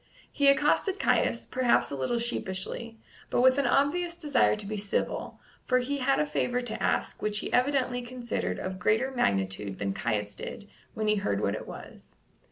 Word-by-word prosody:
He 285 - +2
accosted 295 +8 +3
Caius, - - +1
perhaps 255 -2 +2
a - - -2
little 135 - -1
sheepishly, 230 0 -3 0.3
but - - +2
with 260 +2 +5
an 275 - +2
obvious 340 +7 +1
desire 295 -10 +3
to 210 -1 -6
be 215 +2 -4
civil, 200 -1 -2 0.3
for 255 - +4
he 275 +3 -1
had 270 +1 +2
a 150 - +2
favour 150 - 0
to 225 -3 -3
ask - - 0
which 210 0 +1
he - - -3
evidently 250 -1 +2
considered 240 -1 -3
of 185 0 -5
greater 220 +8 +2
magnitude 95 - 0
than 100 -1 -2
Caius 105 -2 -2
did 205 - -7 0.3
when 215 - -2
he 210 0 +3
heard 100 - 0
what 100 -1 0
it 110 - -6
was. - - -11
235 Hz, 180 wpm, -28 LUFS, 175-260 Hz, 0.3 s, with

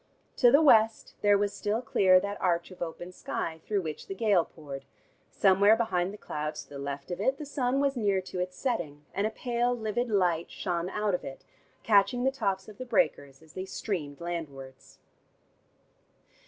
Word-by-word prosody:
To 245 - +6
the 285 +6 +6
West 225 -6 +4
there 205 -1 +5
was 205 0 0
still 210 +2 -1
clear 185 -5 +5
that 200 +2 -5
arch 175 -1 0
of 185 - -13
open 175 +1 -5
sky 160 -2 -4
through 205 -3 0
which 155 -2 -6
the 195 - -5
gale 200 -4 +3
poured; 140 -4 -9 0.4
somewhere 200 +2 +5
behind 190 -6 0
the 210 - -9
clouds 150 -4 -5
to - - -25
the 140 - -8
left 140 +2 -5
of 175 - -3
it, 265 +5 +1
the 300 - -6
sun 270 -2 0
was 280 -1 +1
near 205 -5 +1
to 185 0 -6
its 180 0 -3
setting, 160 - -3
and 200 +2 +1
a - - -2
pale 245 +1 -1
livid 230 +2 -2
light 180 -5 +1
shone 175 -2 -3
out 210 0 -1
of 180 - -1
it, 135 - -8 0.4
catching 225 +4 +3
the 265 - +3
tops 195 -8 -2
of 215 +1 -13
the - - -3
breakers 140 - 0
as 160 - -18
they 185 - -5
streamed 170 -8 -4
landwards. 140 -6 -7
195 Hz, 190 wpm, -29 LUFS, 170-220 Hz, 0.4 s, To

